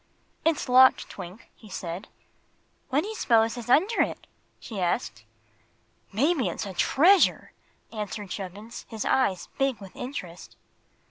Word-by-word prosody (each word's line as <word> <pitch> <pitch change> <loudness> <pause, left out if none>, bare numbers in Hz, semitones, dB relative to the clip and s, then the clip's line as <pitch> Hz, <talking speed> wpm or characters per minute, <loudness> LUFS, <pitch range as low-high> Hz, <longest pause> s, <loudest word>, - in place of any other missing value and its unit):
"It's 325 -1 +1
locked, 260 +1 +6
Twink," 180 +6 -10
he 215 - -16
said. 180 +1 -6 0.8
"What 280 +3 +2
do - - -5
you'spose 230 - +2
is 240 -1 -8
under 380 - +4
it?" - - -2 0.3
she 215 -4 -7
asked. 115 -10 -2 0.9
"Maybe 265 - +2
it's 175 - -4
a 195 - -6
treasure!" 345 - +4 0.4
answered 210 -2 -5
Chubbins, 205 +4 -7
his 220 -2 -4
eyes 195 -9 +1
big 270 -3 +1
with 195 -2 -12
interest. 180 - -7
225 Hz, 130 wpm, -26 LUFS, 190-265 Hz, 0.9 s, locked